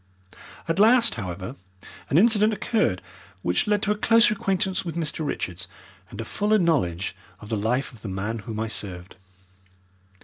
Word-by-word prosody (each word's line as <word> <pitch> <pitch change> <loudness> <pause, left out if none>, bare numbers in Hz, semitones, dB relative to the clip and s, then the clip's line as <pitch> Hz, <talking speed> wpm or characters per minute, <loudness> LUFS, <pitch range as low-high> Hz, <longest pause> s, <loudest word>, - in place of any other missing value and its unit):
At 165 +3 0
last, 235 +3 +5
however, 95 +3 -6 0.5
an 140 - +3
incident 215 +2 +5
occurred 210 - 0 0.4
which 90 - +1
led 210 -1 +1
to 210 - +1
a - - +2
closer 230 +2 +4
acquaintance 190 -2 -1
with 170 -3 -5
Mr. 160 -1 -2
Richards 95 - -4 0.4
and 105 - -10
a 115 - -3
fuller 210 - +1
knowledge 105 - 0 0.2
of 105 - -11
the 110 - 0
life 120 +7 -1
of 115 - -15
the 110 - -7
man 100 +4 -3
whom 110 +1 -6
I 110 - -1
served. 95 -5 -6
140 Hz, 165 wpm, -25 LUFS, -, 0.5 s, last